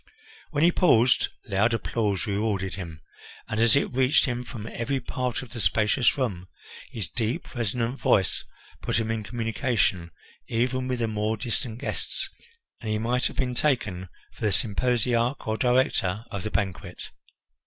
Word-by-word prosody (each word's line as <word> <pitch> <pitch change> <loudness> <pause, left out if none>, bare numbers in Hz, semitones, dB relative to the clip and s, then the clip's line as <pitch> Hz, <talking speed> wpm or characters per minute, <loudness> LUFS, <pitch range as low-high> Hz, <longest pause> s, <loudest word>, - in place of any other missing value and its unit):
When 150 -1 +1
he 170 - +6
paused, 130 -9 +4 0.2
loud 105 +3 +2
applause 105 -4 0
rewarded 100 -2 -1
him, 85 -5 -7 0.5
and 110 - -2
as 115 +1 +5
it 140 - +1
reached 130 +3 +4
him 125 -2 -2
from 115 -3 -8
every 125 +4 -2
part 125 0 -3
of 130 - -12
the 120 - -5
spacious 110 +6 +3
room, 95 -9 -2 0.4
his 115 -7 -4
deep, 115 -1 -3
resonant 120 +2 -1
voice 95 - +2 0.4
put - - 0
him 110 0 -1
in 110 -1 -1
communication 115 -5 0 0.4
even 125 +2 0
with 130 -1 -1
the 115 - +2
more 110 0 -1
distant 115 0 -3
guests, - - 0 0.5
and 110 - -5
he 110 - +1
might 120 +3 +1
have - - -9
been 125 -1 0
taken 105 - 0 0.2
for - - -19
the 105 -2 +2
symposiarch 120 +4 +1
or 110 - 0
director 120 -5 +2
of 100 - -3
the 110 - -3
banquet. 100 -4 -3
115 Hz, 160 wpm, -26 LUFS, 105-125 Hz, 0.5 s, he